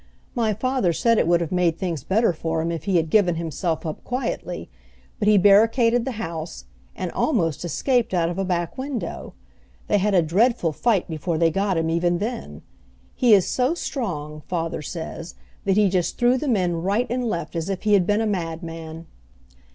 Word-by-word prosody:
My 225 -4 0
father 255 -5 0
said 230 +8 +2
it - - +2
would 170 0 +3
have 165 - -3
made 175 -3 +1
things 170 -8 -3
better 200 +3 +2
for 160 0 -2
him 170 - -1
if 165 -3 -5
he 195 -2 +1
had 160 -1 0
given 185 -5 +4
himself 165 0 -3
up 155 - -5
quietly; 250 +2 -4 0.5
but 210 - 0
he 210 -1 +6
barricaded 225 +4 +4
the 265 - -3
house, 165 -7 -6 0.3
and - - -4
almost 175 - 0
escaped 245 - 0
out 175 -3 +1
of 175 +2 -3
a - - +1
back 175 +2 -2
window. 265 -3 -5 0.5
They 205 - +2
had 205 +1 +1
a 175 - +5
dreadful 190 +2 +2
fight 205 +3 +1
before 160 +1 -2
they 165 0 +3
got 195 +1 0
him 165 0 0
even 175 +1 +1
then. 225 +5 -5 0.5
He 240 -5 +5
is 190 - +3
so 260 +6 +1
strong, 155 - -4
father 165 -3 -2
says, 165 +1 -7 0.3
that 195 0 +2
he 210 -1 +5
just 180 -2 0
threw 245 +1 +4
the 275 +3 -2
men 180 -8 +1
right 200 +7 +1
and 245 -1 -1
left 170 -5 -4
as 165 +2 -2
if 195 -2 -3
he 210 -1 +2
had 185 -3 +4
been 210 +1 +2
a - - 0
madman." 165 -4 -4
185 Hz, 195 wpm, -23 LUFS, 165-225 Hz, 0.5 s, he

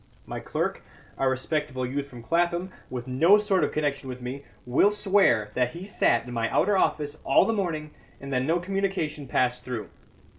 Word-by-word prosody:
My - - -5
clerk - - -2 0.4
(a 135 - +3
respectable 130 0 -1
youth 140 +3 -3
from 120 -4 -11
Clapham, 175 +4 0 0.2
with 125 0 -5
no 165 +11 +5
sort 205 -3 +1
of - - 0
connection 145 -3 -2
with 125 0 -6
me) 130 +3 -6 0.2
will 130 +11 +4
swear 190 - +3
that 125 -1 0
he 175 +3 -7
sat 120 - +2
in 125 - -7
my 115 -1 0
outer 205 0 +2
office 150 -5 0
all - - +5
the 225 - +1
morning, 165 -7 -2 0.3
and 140 0 -6
that 125 - +2
no 160 +6 +1
communication 180 -6 -2
passed 125 0 0
through. 120 -5 -5
145 Hz, 185 wpm, -26 LUFS, 125-175 Hz, 0.4 s, no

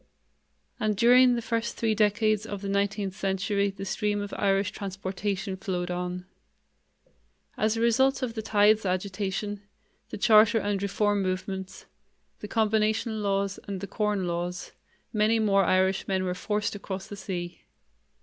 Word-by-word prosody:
And 210 -1 0
during 245 +2 +6
the 235 - -3
first 230 +1 -2
three 225 -1 +1
decades 215 0 +2
of 205 -1 -6
the 200 - -3
nineteenth 200 -1 -1
century 200 +1 0
the 195 0 -7
stream 205 +1 -1
of 205 0 -5
Irish 195 -1 +1
transportation 195 0 -4
flowed 180 -2 -3
on. 180 0 -4 1.3
As 215 +1 +1
a - - -1
result 265 +4 +3
of 240 -3 -2
the 220 - -4
Tithes 215 0 +3
agitation, 195 +2 -2 0.5
the - - -6
Charter 220 +1 +5
and 205 -2 -1
Reform 205 0 +1
movements, 190 0 -4 0.5
the 210 - -7
Combination 220 +1 +1
Laws 200 -1 -1
and 200 -2 -4
the 200 - -5
Corn 205 -1 -1
Laws, 175 +1 -3 0.4
many 215 +1 +3
more 200 -3 +3
Irishmen 190 +1 +1
were 180 -1 -1
forced 210 +3 -2
across 195 -1 -6
the 205 - -8
sea. 180 -3 -5
200 Hz, 145 wpm, -27 LUFS, 190-215 Hz, 1.3 s, during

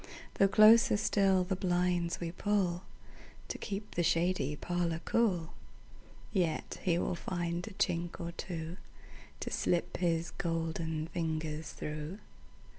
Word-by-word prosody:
Though 195 - +7
closer 215 +2 +7
still 195 -3 +3
the 190 +1 -1
blinds 180 -1 0
we 170 -1 -3
pullTo 180 -2 0 0.8
keep 205 +1 -5
the 175 - +1
shady 165 -3 +1
parlour 170 0 -1
cool, 185 -8 +1 0.8
Yet 175 -6 -1
he 175 -2 +2
will 175 - 0
find 175 0 -3
a 215 - -7
chink 175 -4 -1
or 170 0 -4
twoTo 170 0 -5 0.7
slip 175 0 0
his 170 -2 0
golden 160 -1 -2
fingers 160 -2 -3
through. 150 +4 -5
175 Hz, 115 wpm, -32 LUFS, 165-190 Hz, 0.8 s, Though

